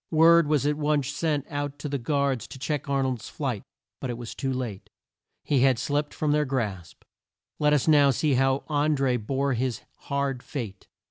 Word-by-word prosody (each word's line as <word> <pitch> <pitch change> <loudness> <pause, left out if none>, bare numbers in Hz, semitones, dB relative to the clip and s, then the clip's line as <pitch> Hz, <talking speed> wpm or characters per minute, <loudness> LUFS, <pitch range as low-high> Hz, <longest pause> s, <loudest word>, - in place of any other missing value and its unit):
Word 165 0 +6
was 150 -2 +2
at 145 0 +1
once 150 -3 +1
sent 145 -1 -1
out 145 -2 -4
to - - -5
the 140 -1 -2
guards 140 -1 0
to - - -10
check 145 +1 -3
Ar 135 -1 +2
nold's 125 -3 -3
flight, 130 -8 -3 0.4
but 130 - -4
it 120 - -3
was 120 -2 -7
too 135 -1 -2
late. 120 -7 -4 0.5
He 140 - +2
had 130 -1 +4
slipped 145 +4 -1
from 150 -1 -1
their 150 0 +3
grasp. 105 - -4 0.6
Let 150 0 +3
us 150 -1 +2
now 145 -3 +6
see 140 +2 +1
how 135 +1 +2
An 150 0 +1
dré 125 -4 +1
bore 135 +4 0
his 125 -2 -1 0.2
hard 140 -2 -1
fate. 115 -10 -6
140 Hz, 195 wpm, -26 LUFS, 130-150 Hz, 0.6 s, Word